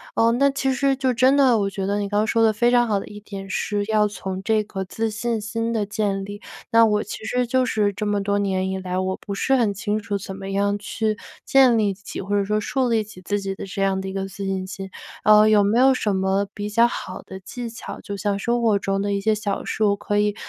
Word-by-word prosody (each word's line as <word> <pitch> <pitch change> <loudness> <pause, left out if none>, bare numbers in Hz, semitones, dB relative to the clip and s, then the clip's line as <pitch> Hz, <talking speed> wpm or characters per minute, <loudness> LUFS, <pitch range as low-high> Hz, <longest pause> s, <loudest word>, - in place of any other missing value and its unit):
呃， 230 0 +4
那 275 +3 +3
其 270 0 0
实 275 +1 +1
就 260 -1 +1
真 255 +3 +4
的 265 -4 +5
我 200 -2 0
觉 195 0 -3
得 205 - 0
你 205 -1 -1
刚 205 +1 +1
说 225 0 +2
的 220 -1 +4
非 240 +3 +2
常 240 -1 +4
好 205 -2 +1
的 - - -8
一 210 - -9
点 195 -2 -8
是 205 +2 -1
要 215 -1 +3
从 190 -2 -5
这 215 +1 +2
个 195 -2 -5
自 225 +4 -2
信 230 +1 -2
心 230 +2 -2
的 210 -3 -1
建 205 -2 -1
立， 205 +1 -7 0.3
那 230 0 +7
我 210 -1 +2
其 220 - -8
实 250 +2 0
就 255 +1 +2
是 210 -4 +1
这 200 +2 -4
么 205 -1 0
多 200 +1 0
年 190 -2 0
以 190 - -2
来， 185 -1 -3
我 190 0 -1
不 200 - -7
是 270 +7 +1
很 230 -6 +2
清 210 +1 -2
楚 205 -1 -3
怎 190 0 -7
么 195 0 -6
样 200 +1 +1
去 215 +1 -2 0.3
建 260 -4 +5
立 205 -2 +1
起， 200 +1 -7
或 195 - -10
者 200 - +1
说 210 +1 0
树 255 +3 0
立 225 -2 +2
起 210 -3 -13
自 205 +3 -1
己 195 -1 -3
的 - - -7
这 195 +1 -5
样 195 -1 +1
的 190 - -5
一 190 - -5
个 195 0 -3
自 195 +1 -7
信 190 -1 -2
心。 195 0 -7 0.3
呃， 215 0 +7
有 210 -1 +5
没 210 +4 +2
有 265 +1 +5
什 210 -5 0
么 190 +1 +1
比 205 0 -4
较 230 +3 +4
好 185 -5 -6
的 190 - -9
技 230 +5 -7
巧， 230 - -8
就 200 - -6
像 200 0 -1
生 235 +4 0
活 220 -3 +3
中 195 0 -1
的 205 0 -1
一 - - 0
些 215 +2 +2
小 205 -2 -3
事 220 - -1
我 200 -1 +3
可 205 0 -2
以 210 0 +1
205 Hz, 285 characters per minute, -23 LUFS, 195-225 Hz, 0.3 s, 那